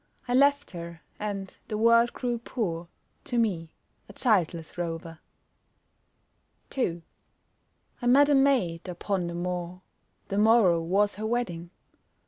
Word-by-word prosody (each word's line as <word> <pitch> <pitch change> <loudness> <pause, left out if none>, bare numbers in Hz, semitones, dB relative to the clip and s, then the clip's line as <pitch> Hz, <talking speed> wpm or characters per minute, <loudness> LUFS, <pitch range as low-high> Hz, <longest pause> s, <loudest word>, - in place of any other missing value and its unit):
I 245 - -1
left 285 +2 +3
her 170 -2 -8 0.2
and 200 -2 -4
the 215 - -3
world 230 +2 +5
grew 240 -2 -3
poor 175 -9 -3 0.4
To 245 - -2
me, 180 -8 -1 0.3
a - - -11
childless 175 - 0
rover. 165 -1 -5 1.5
2 175 -10 -2 1.0
I 245 - -1
met 280 +4 +6
a 290 - +3
maid 245 -12 +2
upon 180 0 -2
the 170 - -5
moor, 180 +1 -4 0.5
The 200 - 0
morrow 210 -6 +5
was 195 +4 +1
her 215 +1 -3
wedding. 180 -8 -2
195 Hz, 125 wpm, -27 LUFS, 170-235 Hz, 1.5 s, met